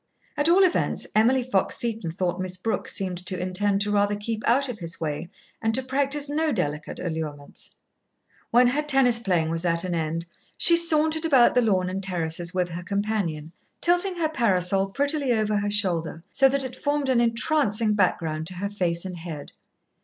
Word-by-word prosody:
At 290 +2 +1
all 375 +3 +6
events, 365 - 0
Emily 245 +4 +3
Fox 240 -6 0
Seton 225 -7 -1
thought 175 +1 -2
Miss 185 0 -5
Brooke 220 +5 -3
seemed 185 -3 -2
to 185 0 -3
intend 195 +2 0
to 205 0 0
rather 205 0 +2
keep 215 +2 -4
out 270 +4 +3
of 245 -4 -6
his 165 -2 -5
way 155 +1 -4 0.3
and 225 0 0
to 260 - +4
practise 280 +2 0
no 310 +2 0
delicate 150 - -3
allurements. 155 -4 -6 0.8
When 245 +2 +5
her 285 +4 0
tennis 270 -5 +4
playing 175 -7 0
was 165 +1 -2
at 170 -1 +1
an 180 -1 -3
end, 165 0 -2 0.3
she 340 - +4
sauntered 315 -1 +3
about 270 -7 +5
the 250 - +3
lawn 190 -5 +1
and 190 +1 -3
terraces 170 -2 -2
with 180 -1 -1
her 170 +1 -6
companion, 190 -5 -2 0.3
tilting 355 +2 +2
her 330 -3 0
parasol 195 - +1
prettily 280 +2 0
over 215 -2 0
her 205 0 -1
shoulder, 175 -5 -1
so 270 -1 +4
that 275 0 0
it 255 -1 -6
formed 290 +1 -1
an 255 -2 +3
entrancing 230 -3 +1
background 160 -5 0
to 185 - -4
her 200 +3 -4
face 175 -3 -2
and 180 -2 -6
head. 160 -4 -8
205 Hz, 185 wpm, -25 LUFS, 175-260 Hz, 0.8 s, all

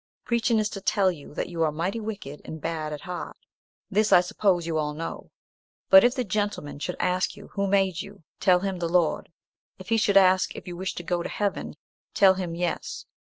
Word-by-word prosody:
Preaching 235 -1 +1
is 215 -1 +2
to 195 - -7
tell 195 -1 +2
you 150 -3 -11
that - - -2
you 170 -2 -4
are 160 -2 +3
mighty 175 +8 -2
wicked 205 -10 -6
and 160 - -7
bad 155 -1 -3
at 150 - -6
heart. 180 0 -6 0.5
This, 210 +2 +2
I - - +9
suppose, 180 -1 +1
you 160 -2 -1
all 150 -1 -2
know. 165 +2 -6 0.6
But 190 0 +10
if 245 +1 +3
the 255 - 0
gentleman 205 -9 -3
should 180 +4 -3
ask 180 0 0
you - - -12
who 200 -1 -1
made 190 -3 +2
you, 200 -3 -12 0.2
tell 180 -1 +4
him 190 -2 -2
the 170 -1 -1
Lord; 170 -2 +1 0.5
if 185 - -11
he 225 -1 +3
ask 185 -1 +5
if - - -9
you 175 - -6
wish 190 +2 -4
to 175 - -6
go 175 0 -1
to - - -4
heaven, 205 -1 -2 0.4
tell 195 -2 +6
him 180 -3 -4
yes. 175 0 -3
185 Hz, 210 wpm, -26 LUFS, 165-200 Hz, 0.6 s, But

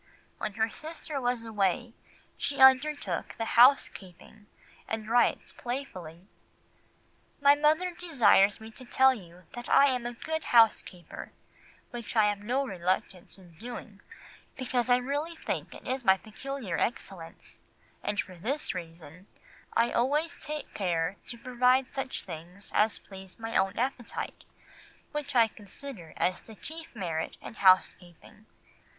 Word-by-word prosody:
When 210 - -3
her 225 +1 0
sister 310 -2 -6
was 245 -2 -1
away, 220 +2 0 0.4
she 280 - -2
undertook 265 +3 +4
the 225 - -2
housekeeping, 215 -5 +3 0.4
and 220 -1 -4
writes 240 +2 +2
playfully— 190 - -6 1.1
"My 285 0 +7
mother 310 +5 +2
desires 255 - +4
me 220 0 -10
to 255 - -11
tell 265 +2 +4
you 180 -5 -12
that 240 0 -7
I 280 - +7
am 245 -1 -2
a 240 - -5
good 315 +6 -4
housekeeper, 220 -6 +2 0.6
which 240 -1 -7
I 215 -2 +5
have 205 -1 -2
no 250 +7 0
reluctance 185 -3 -2
in 180 -3 -17
doing, 225 -3 -8 0.6
because 250 -1 -1
I 245 - +6
really 290 +6 -3
think - - -4
it 260 0 -4
my 190 -3 +5
peculiar 220 -2 -5
excellence, 180 -7 -5 0.4
and 205 0 -2
for 185 -2 -3
this 270 - -2
reason—I 175 +6 -5
always 295 +7 +1
take 300 0 -6
care 175 -1 -1
to 240 - -7
provide 250 +2 +2
such 270 -1 -4
things 175 +3 -9
as 215 +1 +3
please 190 -1 -12
my 225 0 -6
own 195 +1 +2
appetite, 250 -1 -3 0.7
which 290 -2 -4
I 230 -2 +6
consider 210 - -9
as 180 - +1
the 220 - -14
chief 320 +6 -10
merit 165 -6 -3
in - - -9
housekeeping. 185 0 +2
230 Hz, 135 wpm, -29 LUFS, 190-265 Hz, 1.1 s, My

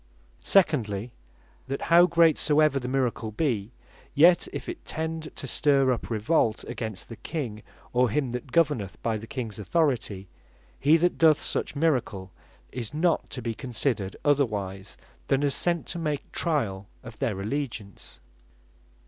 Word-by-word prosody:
Secondly, 120 - +2 0.6
that 135 +1 -3
how 175 +1 +8
great 165 -2 +4
soever 150 -2 +3
the 125 - -5
miracle 125 -4 -1
be, 110 -3 -1 0.4
yet 170 +4 +6
if - - -6
it 350 -1 -6
tend 160 0 -4
to - - -5
stir 135 0 +3
up 125 - -3
revolt 110 0 +1
against 110 -5 -5
the 115 - -9
King, 120 -10 -5 0.3
or 125 0 +3
him 130 +2 -1
that 125 +2 -6
governeth 140 - +1
by 115 -1 0
the 115 - -10
Kings 115 -6 -5
authority, 110 - 0 0.5
he 150 +4 +5
that 175 +2 +1
doth 160 -2 +6
such - - -2
miracle, 125 - 0 0.4
is 120 +2 -6
not 165 +1 +1
to 125 -4 -6
be 115 - -2
considered 115 -4 -2
otherwise 105 -10 0 0.3
than 135 +1 +2
as 140 -1 +2
sent 170 -2 0
to 175 - -4
make 150 -3 -3
triall 105 - -1 0.2
of - - -11
their 95 - -1
allegiance. 110 -3 -5
130 Hz, 150 wpm, -26 LUFS, 110-155 Hz, 0.6 s, how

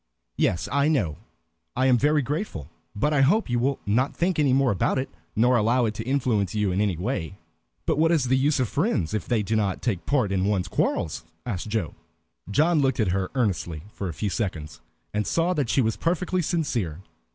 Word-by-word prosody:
"Yes, 85 -1 0
I 140 +2 +2
know. 100 - +1 0.6
I 130 - +2
am 130 -1 +5
very 150 +2 +3
grateful, 135 - -4 0.2
but 150 +9 +1
I 140 - +3
hope 165 - +3
you 120 - +2
will 135 +3 0
not 125 +7 +1
think 175 -1 0
any 145 -3 +3
more 135 0 +3
about 100 - +1
it, 130 - -2 0.2
nor 125 +3 +4
allow 120 +2 +3
it 110 - -1
to 110 - -5
influence 115 -7 0
you 105 -2 +1
in 95 +3 0
any 100 -5 0
way." 95 -2 -3 0.5
"But - - +1
what 165 +1 +4
is 160 -6 +3
the 130 +1 +2
use 140 +2 +2
of 125 - +1
friends 140 - 0
if 105 - -2
they 115 -4 +1
do 110 +3 -1
not 100 -3 0
take 105 -8 0
a - - -29
part 130 -9 0
in 95 -1 +1
one's 100 -3 0
quarrels?" 80 - -1 0.2
asked 105 -5 -3
Joe. 105 - -2 0.6
John 155 - +3
looked 135 -1 +1
at 105 -4 +2
her 95 +1 -1
earnestly 90 - -1
for 95 - -4
a - - -5
few 100 +6 -2
seconds, 80 - -4 0.3
and 105 0 -1
saw 170 +2 +1
that 145 -8 -1
she 135 - +3
was 110 -2 0
perfectly 180 +2 0
sincere. 120 - -2
120 Hz, 215 wpm, -25 LUFS, 100-140 Hz, 0.6 s, am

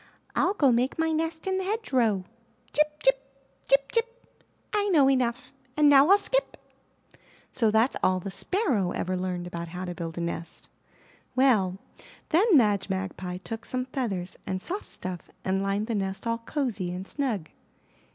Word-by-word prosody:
Til 375 - +3
go 275 -7 +5
make 245 +3 +1
my 320 0 +1
nest 320 +1 -2
in 380 0 0
the - - -2
hedgerow.' 255 - 0 0.5
''Chip! 300 0 +1
chip! - - +4 0.5
Chip! 275 0 +3
chip! 475 +1 -3 0.3
I 410 -1 +1
know 295 -7 +5
enough 255 -2 0 0.2
And 300 -1 +6
now 280 0 +7
Til 395 +3 +7
skip!" - - -1 0.9
So 230 -4 +2
that's 220 +4 +3
all 185 0 +3
the 195 +2 -6
Sparrow 235 - 0
ever 185 +1 -2
learned 180 -1 -3
about 170 -1 -5
how 180 +2 -6
to 175 - -4
build 165 -2 -6
a - - -2
nest. 170 0 -5 0.6
Well, 215 -9 +3 0.5
then 360 +2 +5
Madge 205 -5 +2
Magpie 190 -1 -3
took 225 0 -6
some 255 0 -3
feathers 215 -9 -3
and 185 - -1
soft 380 - -5
stuff 180 -2 -7 0.2
and 190 +1 +1
lined 195 +2 0
the 230 - -3
nest 195 -1 -3
all 230 0 0
cozy 230 - -2
and 185 +2 -6
snug. 230 - -2
235 Hz, 165 wpm, -27 LUFS, 185-300 Hz, 0.9 s, now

